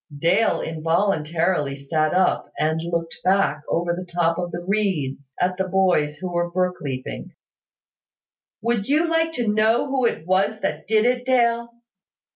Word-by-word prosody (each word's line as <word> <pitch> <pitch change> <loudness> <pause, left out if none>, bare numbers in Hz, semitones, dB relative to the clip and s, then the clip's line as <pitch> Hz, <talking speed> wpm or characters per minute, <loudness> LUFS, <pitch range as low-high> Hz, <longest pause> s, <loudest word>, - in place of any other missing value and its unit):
Dale 180 +9 +2
involuntarily 165 -2 0
sat 155 +2 0
up, 185 +1 +1
and 160 +1 0
looked 170 0 -3
back, 185 -6 +2
over 170 +1 0
the 180 0 -7
top 170 0 +1
of 175 -1 -2
the 175 - -4
reeds, 150 -10 -1
at 180 0 0
the 190 - 0
boys 180 -6 +2
who 180 +2 -5
were 175 0 0
brook 180 +1 0
leaping. 130 -3 -6 1.3
"Would 235 -3 0
you 310 +4 +2
like 325 0 +1
to 240 -6 -2
know 215 +4 +3
who 260 -3 +2
it 160 - -4
was 195 +4 +1
that - - -3
did 220 0 +3
it, 250 0 +1
Dale?" 235 -2 +2
180 Hz, 155 wpm, -23 LUFS, 165-215 Hz, 1.3 s, know